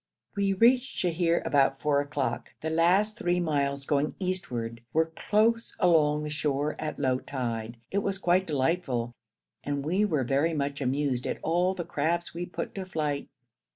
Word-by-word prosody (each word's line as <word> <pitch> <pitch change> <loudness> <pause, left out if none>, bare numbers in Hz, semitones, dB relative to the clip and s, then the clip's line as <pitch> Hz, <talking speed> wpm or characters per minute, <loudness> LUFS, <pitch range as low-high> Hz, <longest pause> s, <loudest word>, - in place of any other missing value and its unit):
We 200 -1 +1
reached 245 +6 +3
Sheher 170 -1 +1
about 135 -1 +3
four 145 -1 +2
o'clock. 140 -4 -3
The 160 - -1
last 185 +6 +3
three 175 0 +1
miles, 140 -4 0
going 145 +1 0
eastward, 120 -12 -3
were 160 +1 +2
close 230 +2 +1
along 150 -4 +4
the 150 - -4
shore 150 0 -1
at 155 - -3
low 130 -1 +1
tide. 115 -4 -4
It 200 - +1
was 200 -1 -1
quite 185 0 +2
delightful, 135 -5 0 0.5
and 145 -1 -2
we 185 +6 +2
were 155 -10 +1
very 140 +6 +1
much 140 -1 -2
amused 135 -1 0
at - - -2
all 180 +3 +2
the 175 -2 -4
crabs 170 +1 -1
we 175 +1 -4
put - - -5
to 190 -1 -5
flight. 150 -5 -2
155 Hz, 165 wpm, -28 LUFS, 140-180 Hz, 0.5 s, along